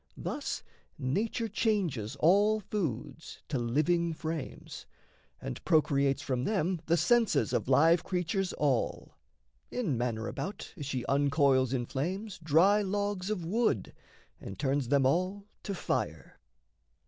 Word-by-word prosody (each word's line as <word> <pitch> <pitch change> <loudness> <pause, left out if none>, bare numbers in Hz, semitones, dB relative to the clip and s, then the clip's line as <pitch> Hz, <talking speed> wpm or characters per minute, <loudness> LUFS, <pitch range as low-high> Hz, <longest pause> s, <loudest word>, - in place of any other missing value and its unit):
Thus - - -4 0.3
nature 215 - -1
changes 190 - -1
All 205 +6 +4
foods 165 - -5
to 140 -4 -1
living 155 +8 +1
frames, 160 -1 -6 0.5
and - - -6
procreates 140 -4 +2
From 125 -2 -1
them 185 -3 0
the 170 +1 +3
senses 200 - +2
of - - 0
live 160 +6 +5
creatures 180 +1 -1
all, 140 -5 -1 0.5
In 210 - -1
manner 115 -2 -2
about 200 +3 -5
as 145 -7 -6
she 130 -3 -3
uncoils 140 -2 +3
in 125 -2 -1
flames 180 - -4
Dry 170 +7 +4
logs 200 -1 -2
of 190 -6 -2
wood 185 - 0 0.5
and 95 - -8
turns 140 -2 0
them 140 0 +3
all 185 +8 0 0.2
to 200 - -4
fire. - - -3
165 Hz, 125 wpm, -30 LUFS, 135-195 Hz, 0.5 s, live